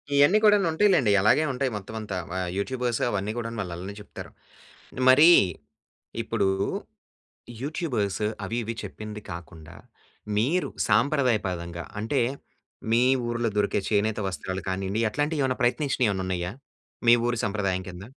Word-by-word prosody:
ఇయన్నీ 145 Hz, +9 st, +6 dB
కూడాను 205 Hz, -3 st, +5 dB
ఉంటాయి 205 Hz, +6 st, +3 dB
లెండి. 125 Hz, -, +3 dB
అలాగే 110 Hz, +9 st, +4 dB
ఉంటాయి 130 Hz, 0 st, -1 dB
మొత్తమంతా. 105 Hz, -1 st, -6 dB
వ -, -, -4 dB, 0.2 s
యూట్యూబర్స్ 120 Hz, +3 st, -1 dB
అవన్నీ 100 Hz, 0 st, -2 dB
కూడాను 115 Hz, -1 st, -4 dB
వాళ్ళు 90 Hz, -3 st, -5 dB
అలానే 95 Hz, +4 st, -7 dB
చెప్తారు. 105 Hz, -, -10 dB, 0.8 s
మరి 150 Hz, +6 st, +8 dB, 0.9 s
ఇప్పుడు 95 Hz, -, 0 dB, 1.1 s
యూట్యూబర్స్ 125 Hz, -, -2 dB, 0.2 s
అవి 115 Hz, -, -3 dB
ఇవి 115 Hz, +1 st, -4 dB
చెప్పింది 105 Hz, -1 st, -7 dB
కాకుండా, 85 Hz, -2 st, -10 dB, 0.6 s
మీరు 155 Hz, +12 st, +1 dB, 0.2 s
సాంప్రదాయపదంగా 95 Hz, -, +1 dB, 0.2 s
అంటే 115 Hz, +5 st, 0 dB, 0.7 s
మీ 115 Hz, +2 st, +4 dB, 0.2 s
ఊర్లో 120 Hz, -1 st, -1 dB
దొరికే 105 Hz, 0 st, +1 dB
చేనేత 110 Hz, +1 st, +1 dB
వస్త్రాలు 95 Hz, +2 st, -4 dB
కానీయండి, 95 Hz, +3 st, -2 dB
అట్లాంటివి 145 Hz, +5 st, -1 dB
ఏమైనా 130 Hz, -1 st, 0 dB
ప్రయత్నించినవి 125 Hz, 0 st, +1 dB
ఏమన్నా 95 Hz, -2 st, -2 dB
ఉన్నాయా? 90 Hz, -1 st, -2 dB, 0.6 s
మీ 115 Hz, -, +9 dB
ఊరి 120 Hz, -1 st, 0 dB
సంప్రదాయం 100 Hz, -3 st, -1 dB
కింద. 90 Hz, +1 st, -9 dB
110 Hz, 130 wpm, -26 LUFS, 95-130 Hz, 1.1 s, మీ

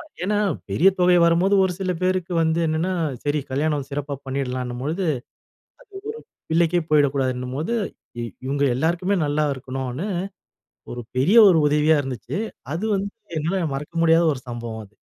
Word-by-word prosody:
ஆமா -, -, -10 dB, 0.2 s
ஏன்னா 205 Hz, +1 st, +1 dB, 0.3 s
பெரிய 185 Hz, +4 st, +5 dB
தொகை 180 Hz, 0 st, +5 dB
வரும்போது 175 Hz, +4 st, +3 dB
ஒரு 185 Hz, -, 0 dB
சில 185 Hz, -1 st, 0 dB
பேருக்கு 185 Hz, -1 st, 0 dB
வந்து 160 Hz, +1 st, +1 dB
என்னென்னா 160 Hz, +4 st, 0 dB, 0.3 s
சரி, 145 Hz, 0 st, +1 dB
கல்யாணம் 145 Hz, 0 st, 0 dB
சிறப்பா 145 Hz, 0 st, -3 dB
பண்ணிடலாம்னும் 125 Hz, -2 st, -3 dB
பொழுது 170 Hz, +5 st, -1 dB
அது -, -, -1 dB
ஒரு -, -, -14 dB, 1.3 s
பிள்ளைக்கே 170 Hz, +1 st, +3 dB
போய்விடக்கூடாதுன்னும்போது, 135 Hz, -, +1 dB, 0.7 s
இவங்க 140 Hz, +1 st, -1 dB
எல்லோருக்குமே 175 Hz, +6 st, +1 dB
நல்லா 150 Hz, +1 st, +1 dB
இருக்கணும்னு 130 Hz, +5 st, -4 dB, 0.9 s
ஒரு 120 Hz, -, -5 dB, 0.2 s
பெரிய 180 Hz, -, +4 dB
ஒரு 170 Hz, -3 st, +5 dB
உதவியா 150 Hz, +1 st, +3 dB
இருந்துச்சு. 130 Hz, -, -5 dB, 0.4 s
அது 185 Hz, +6 st, -3 dB
வந்து 200 Hz, +1 st, -3 dB, 0.3 s
என்னால 170 Hz, +3 st, -1 dB
மறக்க 150 Hz, +4 st, -6 dB
முடியாத 165 Hz, +1 st, +5 dB
ஒரு 130 Hz, -, -10 dB
சம்பவம் 115 Hz, -2 st, -5 dB
அது. 105 Hz, -, -28 dB
150 Hz, 145 wpm, -23 LUFS, 135-175 Hz, 1.3 s, பெரிய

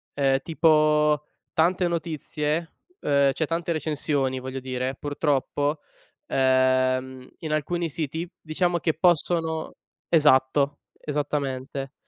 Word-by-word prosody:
ehm, 135 Hz, -1 st, +2 dB
tipo 150 Hz, -1 st, +3 dB, 0.3 s
tante 175 Hz, +2 st, +2 dB
notizie, 160 Hz, -1 st, -2 dB, 0.3 s
ehm, 140 Hz, -1 st, +3 dB
cioè 160 Hz, -, -1 dB
tante 165 Hz, +2 st, -2 dB
recensioni 145 Hz, -4 st, -1 dB
voglio 130 Hz, +1 st, -5 dB
dire, 130 Hz, 0 st, -3 dB
purtroppo, 145 Hz, +1 st, -1 dB, 0.5 s
ehm, 130 Hz, 0 st, +2 dB
in 155 Hz, -, -5 dB
alcuni 165 Hz, +3 st, -1 dB
siti, 160 Hz, +3 st, -4 dB
diciamo 175 Hz, +2 st, 0 dB
che 160 Hz, -1 st, +1 dB
possono 165 Hz, -1 st, +1 dB, 0.3 s
esatto, 145 Hz, -2 st, +3 dB, 0.2 s
esattamente, 140 Hz, -2 st, -3 dB
150 Hz, 100 wpm, -25 LUFS, 135-160 Hz, 0.5 s, tipo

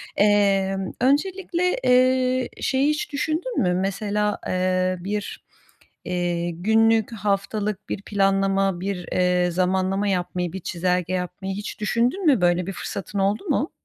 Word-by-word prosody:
Emm, 195 Hz, -2 st, +2 dB
öncelikle, 360 Hz, +5 st, +1 dB
eee, 255 Hz, 0 st, +3 dB
şeyi 275 Hz, +2 st, +2 dB
hiç 300 Hz, 0 st, -2 dB
düşündün 320 Hz, +11 st, -1 dB
mü? 180 Hz, -2 st, +2 dB
Mesela, 205 Hz, +2 st, -1 dB
eee, 185 Hz, 0 st, 0 dB
bir, 205 Hz, +3 st, -4 dB, 0.6 s
eee, 175 Hz, -1 st, -1 dB
günlük, 220 Hz, +5 st, +2 dB
haftalık 205 Hz, 0 st, -2 dB
bir 200 Hz, -, -3 dB
planlama, 195 Hz, -2 st, +1 dB
bir, 190 Hz, -2 st, -4 dB
eee, 180 Hz, -1 st, +2 dB
zamanlama 190 Hz, +3 st, 0 dB
yapmayı, 180 Hz, -2 st, -2 dB
bir 190 Hz, -, -4 dB
çizelge 180 Hz, 0 st, -1 dB
yapmayı 185 Hz, +1 st, -3 dB
hiç 205 Hz, +1 st, -6 dB
düşündün 240 Hz, -, 0 dB
mü? 270 Hz, -, +4 dB
Böyle 175 Hz, 0 st, +2 dB
bir 195 Hz, -, -3 dB
fırsatın 200 Hz, +1 st, -5 dB
oldu 200 Hz, -, 0 dB
mu? 290 Hz, +2 st, 0 dB
195 Hz, 130 wpm, -23 LUFS, 185-225 Hz, 0.6 s, mü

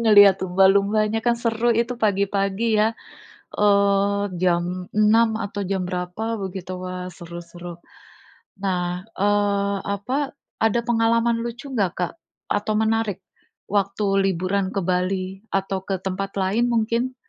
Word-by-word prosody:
ngelihat 205 Hz, -4 st, +7 dB
lumba-lumbanya 200 Hz, +4 st, +3 dB
kan 235 Hz, +1 st, +1 dB
seru 235 Hz, 0 st, 0 dB
itu, 235 Hz, +1 st, +1 dB
pagi-pagi, 200 Hz, +1 st, +1 dB
ya, 220 Hz, +1 st, +1 dB, 0.6 s
eee, 200 Hz, 0 st, +3 dB
jam 175 Hz, -1 st, +2 dB, 0.3 s
6, 220 Hz, +1 st, +3 dB
atau 205 Hz, -1 st, -3 dB
jam 190 Hz, -1 st, -2 dB
berapa 180 Hz, +5 st, -3 dB
begitu. 185 Hz, -1 st, -6 dB
Wah, 180 Hz, 0 st, -5 dB
seru 170 Hz, -1 st, -9 dB
seru. 175 Hz, 0 st, -10 dB, 0.8 s
Nah, 180 Hz, -1 st, -1 dB
eee, 200 Hz, 0 st, +1 dB, 0.2 s
apa, 270 Hz, +8 st, -3 dB, 0.3 s
ada 225 Hz, +1 st, +3 dB
pengalaman 230 Hz, 0 st, +2 dB
lucu 240 Hz, +4 st, -6 dB
nggak, 200 Hz, -8 st, +1 dB
Kak? 180 Hz, -, -1 dB, 0.4 s
Atau 210 Hz, +1 st, 0 dB
menarik 220 Hz, -3 st, 0 dB, 0.5 s
waktu 200 Hz, 0 st, 0 dB, 0.2 s
liburan 190 Hz, +1 st, 0 dB
ke 195 Hz, -, +1 dB
Bali, 185 Hz, +1 st, -1 dB, 0.2 s
atau 195 Hz, -1 st, -1 dB
ke 195 Hz, -, 0 dB
tempat 195 Hz, +1 st, -3 dB
lain 210 Hz, +6 st, +1 dB
mungkin? 235 Hz, +3 st, 0 dB
200 Hz, 125 wpm, -23 LUFS, 185-225 Hz, 0.8 s, ngelihat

